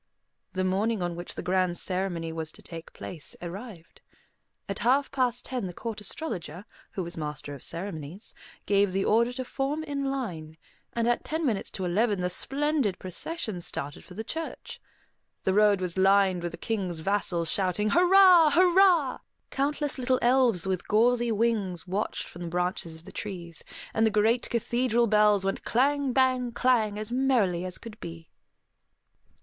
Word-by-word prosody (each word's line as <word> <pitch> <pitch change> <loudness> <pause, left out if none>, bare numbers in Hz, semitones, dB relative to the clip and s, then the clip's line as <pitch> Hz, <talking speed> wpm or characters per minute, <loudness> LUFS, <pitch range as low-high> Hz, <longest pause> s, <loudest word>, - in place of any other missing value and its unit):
The 185 0 -1
morning 195 +2 0
on 175 -1 -2
which 175 +1 -6
the - - -5
grand 180 -1 +1
ceremony 180 -3 -1
was 160 -1 -3
to - - -13
take 165 -1 -9
place 165 -5 -6
arrived. 175 0 -9 0.7
At 195 - -3
half 260 +6 +2
past 250 -3 0
ten 250 -6 -3
the 175 - -8
Court 225 -2 -5
Astrologer, 195 - -3 0.3
who 190 - -3
was 170 0 -6
master 150 -2 -5
of 140 - -10
ceremonies, 170 +1 -6 0.3
gave 200 -2 +2
the 195 0 0
order 235 +3 +3
to 255 0 -4
form 285 +5 -2
in 285 -2 -3
line; 180 - -4 0.4
and 235 0 0
at 240 - +1
ten 320 +1 -2
minutes 220 -7 -1
to 190 - -4
eleven 205 +3 +1
the 180 0 0
splendid 275 -2 +1
procession 205 - -4
started 145 -3 -5
for 180 - -13
the 220 - -4
church. 320 +7 -6 0.6
The 190 - +1
road 205 -1 +4
was 180 0 -2
lined 190 -1 +4
with 175 0 -4
the - - -7
King's 185 -7 -3
vassals 175 -3 0
shouting, 200 +2 +1
"Hurrah, 360 -2 +7
hurrah!" 360 -5 +5 0.3
Countless 285 0 -1
little 255 0 +2
elves 240 -7 +3
with 185 -2 -2
gauzy 235 +2 +3
wings 210 -6 0
watched 195 +3 -2
from 175 - -11
the 175 - -4
branches 175 -1 -2
of 160 +1 -16
the - - -10
trees; 175 -5 -7 0.3
and 220 - +2
the 220 - +5
great 220 +3 +2
cathedral 240 0 +1
bells 210 -2 +4
went 195 - -1
clang, 280 +2 +1
bang, 255 -2 +2
clang, 230 -5 +2
as 215 +1 -2
merrily 235 -9 +1
as 180 -1 -3
could 220 -2 -11
be. 165 -1 -9
210 Hz, 165 wpm, -27 LUFS, 180-250 Hz, 0.7 s, Hurrah